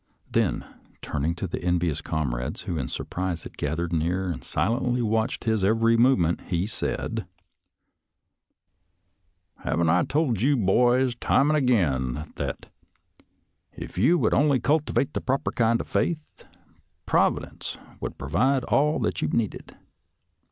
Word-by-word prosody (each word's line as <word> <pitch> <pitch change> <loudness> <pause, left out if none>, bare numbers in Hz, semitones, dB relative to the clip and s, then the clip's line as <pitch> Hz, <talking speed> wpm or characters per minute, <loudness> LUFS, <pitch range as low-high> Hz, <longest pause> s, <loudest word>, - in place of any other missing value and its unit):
Then, - - +1 0.4
turning 75 +3 -1
to 90 - -4
the 90 - -4
envious 85 -3 0
comrades 65 -7 -3
who 90 - -4
in 65 -5 -2
surprise 90 +1 -4
had - - -10
gathered 80 +4 -2
near 90 +4 0
and 85 - -6
silently 120 +7 0
watched 110 +2 0
his 110 -4 +1
every 115 +3 +3
movement, 115 -9 +3
Jie 90 0 0
said, 115 -1 -3 1.5
" - - -32
Haven't 85 0 +1
I 90 +2 +3
told 145 - 0
you, 140 +3 +3
boys, 120 +5 +3
time 140 +4 +2
and 155 - +3
again, 75 - 0
that - - -4 1.1
if - - -8
you_would 160 - +3
only 140 -2 +3
cultivate 145 +1 +1
the - - -2
proper 135 +1 -1
kind 115 0 +2
of - - -5
faith, 155 -3 -2 0.6
Providence - - 0 0.2
would - - -5
provide 130 - +1
all 150 +4 +2
that 90 0 -1
you - - +1
needed.? 105 +6 -2
105 Hz, 135 wpm, -25 LUFS, 85-125 Hz, 1.5 s, every